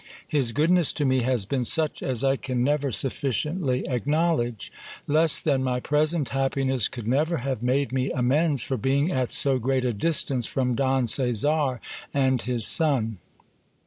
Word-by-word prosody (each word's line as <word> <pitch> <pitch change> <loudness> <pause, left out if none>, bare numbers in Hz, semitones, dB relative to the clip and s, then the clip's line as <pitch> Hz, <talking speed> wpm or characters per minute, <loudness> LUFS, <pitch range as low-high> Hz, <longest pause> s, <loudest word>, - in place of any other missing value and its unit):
His 135 -6 0
goodness 165 +6 +2
to 145 - -1
me 130 -1 +2
has 125 -4 0
been 130 +4 -1
such 155 +5 +1
as 130 -2 -2
I 135 0 +2
can 125 -2 -2
never; 145 0 0
sufficiently 135 - -1
acknowledge. 135 - -1 0.3
Less 155 0 +3
than 135 -4 0
my 125 -1 -1
present 150 +2 0
happiness 135 -3 0
could 120 -4 -8
never 155 +7 +1
have 135 -2 -3
j 120 - -6
made 135 +2 0
me 130 0 -1
amends 140 +2 +1
for 130 - -2
being 140 - 0
at 130 -2 -1
so 135 -2 +2
great 130 +1 0
a 120 - 0
distance 130 0 -1
from 125 -2 -1
Don 130 0 +1
Caesar 130 +3 +1 0.4
and 130 -3 +2
his 120 -3 -2
son. 125 - +2
135 Hz, 165 wpm, -25 LUFS, 125-145 Hz, 0.4 s, Less